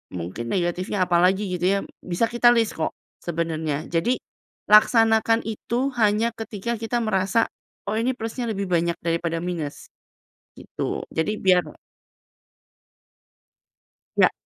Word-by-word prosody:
mungkin 90 Hz, +7 st, -5 dB
negatifnya 185 Hz, +2 st, 0 dB
apalagi 180 Hz, +4 st, +3 dB
gitu 175 Hz, -, -2 dB
ya, 200 Hz, +1 st, +3 dB, 0.2 s
bisa 180 Hz, +6 st, 0 dB
kita 240 Hz, 0 st, +3 dB
list 225 Hz, -2 st, +2 dB
kok 160 Hz, -, -1 dB, 0.3 s
sebenarnya. 160 Hz, -3 st, -2 dB
Jadi, 175 Hz, +10 st, +2 dB, 0.6 s
laksanakan 225 Hz, +1 st, +5 dB
itu 240 Hz, +5 st, -2 dB
hanya 215 Hz, +2 st, +3 dB
ketika 225 Hz, +1 st, -4 dB
kita 230 Hz, +2 st, -1 dB
merasa, 215 Hz, +1 st, +1 dB, 0.4 s
"Oh 215 Hz, -, -1 dB
ini 245 Hz, +3 st, +1 dB
plusnya 225 Hz, +2 st, -4 dB
lebih 200 Hz, -2 st, -2 dB
banyak 170 Hz, -1 st, +1 dB
daripada 165 Hz, 0 st, -1 dB
minus." 165 Hz, -5 st, -5 dB, 0.7 s
gitu. -, -, -4 dB
Jadi 210 Hz, +7 st, -1 dB
biar 180 Hz, -2 st, +4 dB, 2.5 s
Nggak. -, -, +5 dB
195 Hz, 115 wpm, -24 LUFS, 170-225 Hz, 2.5 s, laksanakan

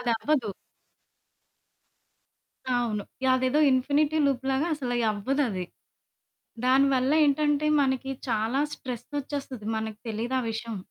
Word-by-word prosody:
అదవ్వదు. 240 Hz, 0 st, 0 dB, 2.3 s
అవును. 220 Hz, -4 st, -1 dB, 0.2 s
యదేదో 260 Hz, +3 st, +3 dB
infinity 290 Hz, +4 st, +2 dB
loop 270 Hz, -3 st, +1 dB
లాగా 270 Hz, +4 st, +1 dB
అసలయ్యి 245 Hz, -5 st, -1 dB
అవ్వదది. 210 Hz, -3 st, -1 dB, 1.0 s
దానివల్ల 265 Hz, +1 st, +3 dB
ఏంటంటే 295 Hz, +1 st, +2 dB, 0.2 s
మనకి 265 Hz, 0 st, -1 dB, 0.2 s
చాలా 225 Hz, +4 st, 0 dB
స్ట్రెస్ 245 Hz, -3 st, -7 dB
ఓచ్చేస్తది 275 Hz, -5 st, -5 dB
మనకి 220 Hz, -1 st, -4 dB
తెలియదు 230 Hz, +4 st, -2 dB
ఆ -, -, -4 dB
విషయం. 225 Hz, -1 st, -5 dB
255 Hz, 100 wpm, -27 LUFS, 230-280 Hz, 2.3 s, యదేదో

